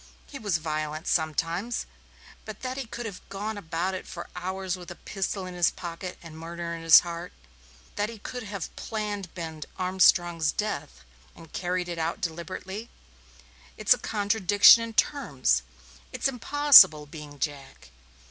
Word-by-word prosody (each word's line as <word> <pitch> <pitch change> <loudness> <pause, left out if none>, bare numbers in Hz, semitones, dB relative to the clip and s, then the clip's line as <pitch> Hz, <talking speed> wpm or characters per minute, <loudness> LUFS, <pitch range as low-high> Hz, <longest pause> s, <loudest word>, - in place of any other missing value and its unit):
He 275 - -9
was 205 -6 0
violent 155 0 -4
sometimes, 165 +7 -1 0.6
but 215 -1 -9
that 255 0 -3
he 265 -3 -5
could 240 +1 -6
have 200 -5 -7
gone 210 +3 -4
about 185 0 -3
for - - -8
hours 185 +1 -3
with 180 -2 -11
a - - -8
pistol 195 -1 -4
in 185 - -7
his 175 -1 +3
pocket 175 +1 -7
and 165 -2 -11
murder 170 +1 -5
in 165 - -6
his 165 -1 +8
heart; 170 0 -6 0.7
that 205 +1 0
he 230 - -9
could 250 +4 -7
have 200 -6 -6
planned 205 -5 -4
Ben 160 -3 -6 0.2
Armstrong's 175 -3 +3
death 130 - -4 0.3
and 165 -2 -15
carried 180 0 -2
it 170 -1 -5
out 160 +1 -2
deliberately 185 +6 -5 0.9
it's - - +5
a - - -5
contradiction 205 0 +5
in 230 0 -5
terms. 140 - +1 0.5
It's - - 0
impossible, 250 - +7
being 150 -1 -10
Jack. 135 - -5
180 Hz, 150 wpm, -27 LUFS, 165-205 Hz, 0.9 s, his